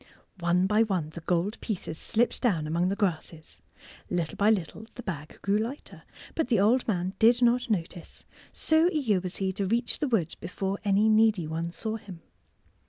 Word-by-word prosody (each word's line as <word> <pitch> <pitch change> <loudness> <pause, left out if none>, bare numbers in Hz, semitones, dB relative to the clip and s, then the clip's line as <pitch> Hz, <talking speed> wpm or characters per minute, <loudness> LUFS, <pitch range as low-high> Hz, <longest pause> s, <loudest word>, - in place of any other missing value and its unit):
One 175 +1 +2
by 210 +3 +3
one 185 -8 0
the 165 - -8
gold 180 +6 -1
pieces 190 -7 -4
slipped 235 +2 0
down 180 -11 +1
among 170 +4 0
the 195 - -1
grasses. 165 -5 -3 0.5
Little 170 -3 -2
by 205 +1 +3
little 215 +1 -1
the 245 - -8
bag 155 -6 -6
grew 200 +1 +2
lighter, 240 +6 -6 0.3
but 320 - -1
the 235 -5 +2
old 230 +6 +3
man 185 -3 -1
did 235 +2 +5
not 240 +1 +3
notice, 175 -4 -4 0.3
so 320 +2 +3
eager 245 - +1
was 185 0 -5
he 190 -1 -1
to 195 0 -2
reach 235 +4 0
the 295 - 0
wood 195 - 0
before 190 +2 -3
any 205 +1 +3
needy 215 -5 +4
one 165 +2 -3
saw 220 +6 -4
him. 195 -6 -11
200 Hz, 180 wpm, -28 LUFS, 175-225 Hz, 0.5 s, did